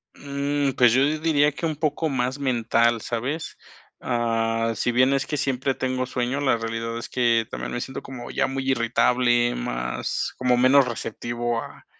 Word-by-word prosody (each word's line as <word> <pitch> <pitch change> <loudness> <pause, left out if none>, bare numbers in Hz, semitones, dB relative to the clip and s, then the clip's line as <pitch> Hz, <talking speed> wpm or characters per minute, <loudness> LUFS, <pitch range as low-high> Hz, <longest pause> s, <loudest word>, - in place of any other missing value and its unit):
Mm, 140 0 -1
pues, 120 -2 +6
yo 130 +2 +4 0.2
diría 150 -2 +3
que 160 +3 -5
un 155 - -1
poco 155 +1 -1
más 130 0 -1
mental, 120 -3 +2
¿sabes?, 130 +9 -4 0.4
ah, 115 -1 0
sí 120 - 0
bien 130 +2 +4
es 135 0 0
que 150 - -3
siempre 135 0 0
tengo 130 0 -2
sueño, 125 +2 -2
la 135 -4 +2
realidad 115 0 -4
es 120 - -8
que 115 -3 +2
también - - -5
me 120 - -3
siento 130 - -6
como 125 -3 -8
ya 135 - 0
muy 135 0 -3
irritable, 120 0 +2
más - - -3
como 125 -1 +2
menos 130 +2 +5
receptivo 120 0 -3
a, - - -13
125 Hz, 170 wpm, -24 LUFS, 115-135 Hz, 0.4 s, pues